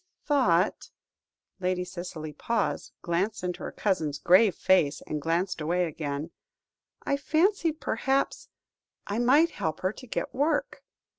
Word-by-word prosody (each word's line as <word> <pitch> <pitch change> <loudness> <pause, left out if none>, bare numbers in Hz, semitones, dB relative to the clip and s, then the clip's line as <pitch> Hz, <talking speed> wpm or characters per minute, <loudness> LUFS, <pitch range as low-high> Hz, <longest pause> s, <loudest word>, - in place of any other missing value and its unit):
"I - - -33
thought" 190 - +2 0.7
Lady 180 -1 -1
Cicely 175 -4 -7
paused, 225 +8 -2
glanced 185 +4 -1
into 180 -1 -3
her - - -5
cousin's 160 -8 -1
grave 185 +3 +5
face, 160 -6 +2
and 150 -1 -3
glanced 170 +3 -1
away 175 +3 +1
again 150 0 -4 0.7
"I 280 - 0
fancied, 325 +2 +1
perhaps, 265 +4 -1 0.6
I 205 +3 -2
might 285 +8 +5
help 155 -1 -3
her 185 +2 0
to 255 - -12
get - - -3
work. 290 +3 0
185 Hz, 135 wpm, -28 LUFS, 165-255 Hz, 0.7 s, grave